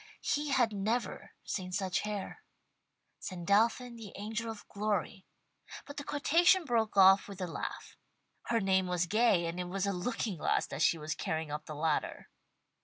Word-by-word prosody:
He 295 0 0
had 245 -5 +2
never 215 +5 -2
seen 185 -2 -4
such 185 0 0
hair. 210 - -5 0.8
"Sandalphon, 220 +7 +1
the 215 -4 -10
angel 220 +3 -4
of 220 -2 -8
glory" 205 -1 -2 0.6
but 285 - -10
the 285 - -4
quotation 330 +6 +3
broke 225 -5 0
off 195 0 +7
with 200 -1 -9
a 185 - -1
laugh. 170 - -6 0.5
Her 230 -1 +2
name 190 -2 +2
was 180 -1 0
Gay, 200 -2 +3
and 170 +2 -4
it 180 - -2
was 195 +1 -1
a 200 - 0
looking 200 +1 -2
glass - - +1
that - - -6
she 170 - +4
was 155 0 -3
carrying 160 -1 -3
up 150 +1 -5
the 155 - -6
ladder. 155 0 -2
200 Hz, 170 wpm, -32 LUFS, 180-230 Hz, 0.8 s, off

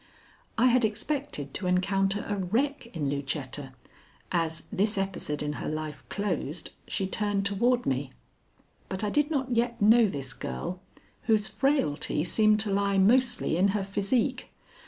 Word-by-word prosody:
I 235 - +4
had 250 0 +3
expected 220 - -2
to 185 - -3
encounter 195 +2 +1
a 205 - -1
wreck 230 +9 -1
in 155 -5 -2
Lucetta, 140 -1 -4 0.6
as, 165 -2 -1
this 210 +1 +1
episode 185 -6 -2
in 150 0 -2
her - - -3
life 155 -3 -5
closed, 175 -6 -3 0.2
she 195 - -1
turned 200 0 -1
toward 240 +5 +2
me. 135 0 -1 0.8
But 190 +2 -3
I 210 - 0
did 295 +4 +2
not 265 -5 -1
yet 235 +1 0
know 225 +2 +6
this 135 -8 -3
girl, 125 - -5 0.5
whose 215 -2 +3
frailty 155 - +1
seemed 215 +4 +3
to 210 -2 0
lie 200 0 +1
mostly 245 -2 +3
in 190 +3 +4
her 200 - -1
physique. 220 +7 0
195 Hz, 150 wpm, -28 LUFS, 160-230 Hz, 0.8 s, know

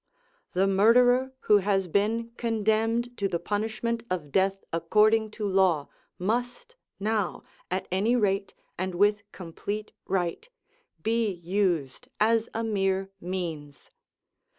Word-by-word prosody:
The 185 +2 +3
murderer 245 +6 +4
who 210 -1 +5
has 195 -1 +1
been 225 +6 0
condemned 225 +1 0
to 200 - 0
the 175 - -1
punishment 220 +4 -2
of 165 -6 -3
death 195 +3 +1
according 215 +6 +3
to 210 -2 -1
law 185 -6 +2 0.3
must 245 - -2 0.2
now, 210 -2 -1 0.3
at 185 +1 -2
any 205 +6 +2
rate, 195 -3 0 0.2
and 185 -1 -2
with 205 +2 +3
complete 200 +4 -6 0.2
right, 185 - -2 0.5
be 225 0 +1
used 175 - -1
as 225 +1 +3
a 225 - -3
mere 195 -3 0
means. 165 -6 -5
205 Hz, 120 wpm, -27 LUFS, 185-225 Hz, 0.5 s, who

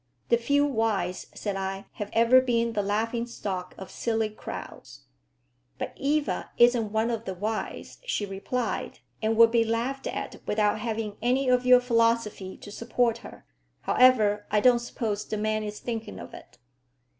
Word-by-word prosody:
"The 235 - +5
few 285 +5 +2
wise," 220 -8 -1
said 205 -2 -3
I, 195 0 -4
"have 205 -1 -6
ever 235 +3 +6
been 235 -2 0
the 210 - +1
laughing 225 +4 -1
stock 185 -6 -5
of 190 - -9
silly 225 -2 -1
crowds." 215 - -9 0.8
"But - - -4
Eva 290 +1 -1
isn't 240 -3 +4
one 220 +2 +1
of 230 -1 -3
the 190 - -4
wise," 215 +4 -4
she 210 - -1
replied, 200 +6 -3 0.2
"and 220 0 +1
would 230 0 +7
be 230 -1 +4
laughed 235 +4 -2
at - - -5
without 210 0 +1
having 220 -2 -3
any 255 +3 +2
of 250 0 +2
your 250 0 +8
philosophy 230 -5 +1
to 205 - -11
support 235 +1 0
her. - - -12 0.4
However, 215 -5 +4
I 210 - +3
don't 245 +2 +5
suppose 220 -3 -3
the 215 - -4
man 215 +1 0
is 210 0 -5
thinking 225 -2 -5
of - - -10
it." - - -13
225 Hz, 165 wpm, -27 LUFS, 210-240 Hz, 0.8 s, your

